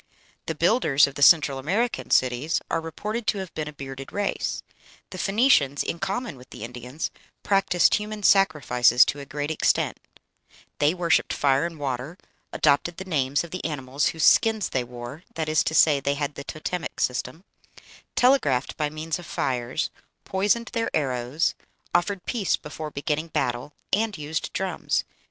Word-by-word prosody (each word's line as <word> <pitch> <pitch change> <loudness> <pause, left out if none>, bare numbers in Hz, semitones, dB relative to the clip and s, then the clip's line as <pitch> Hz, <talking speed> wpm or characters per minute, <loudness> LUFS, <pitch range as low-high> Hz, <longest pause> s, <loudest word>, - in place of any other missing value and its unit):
The 160 - -2
builders 170 - +4
of 140 - -6
the 145 - -7
Central 145 -3 +6
American 205 - -1
cities 130 +5 +2
are - - +1
reported 210 +8 -5
to - - +2
have 190 -2 -6
been 155 -1 -4
a - - -5
bearded 135 -2 -8
race. 205 -1 -2 0.5
The 185 - -7
Phoenicians, 195 - +3
in 170 - -3
common 195 - -3
with 125 +1 -15
the - - -9
Indians, 125 +5 -5 0.3
practised 195 -3 +3
human 210 0 -2
sacrifices 140 - +5
to 145 - -3
a 140 - -9
great 145 +2 -3
extent; 160 - +1 0.8
they 150 +4 +3
worshipped 175 -2 +2
fire 140 +3 +2
and 165 -2 -10
water, 140 +3 -4 0.3
adopted 165 +4 +2
the 190 - -6
names 140 -5 0
of 170 - -10
the 185 - -5
animals 140 -2 -1
whose 160 - -2
skins 220 -3 +4
they 130 - -1
wore 120 +5 -9
that 160 -1 -2
is 155 0 +3
to 160 - -1
say, 150 -3 +5
they 140 +1 0
had 145 0 -2
the 140 - -8
totemic 165 +2 -5
system 130 +7 -2 0.7
telegraphed 245 - +3
by 150 -2 0
means 155 +2 -4
of 175 - -10
fires, 125 +3 -2 0.3
poisoned 205 +5 0
their 230 0 0
arrows, 130 +2 0 0.4
offered 185 +2 0
peace 220 -7 0
before 155 +1 -7
beginning 150 +2 -2
battle, 120 -3 -2 0.2
and 215 -1 +1
used 155 +1 -3
drums. - - -1
155 Hz, 165 wpm, -25 LUFS, 135-185 Hz, 0.8 s, Central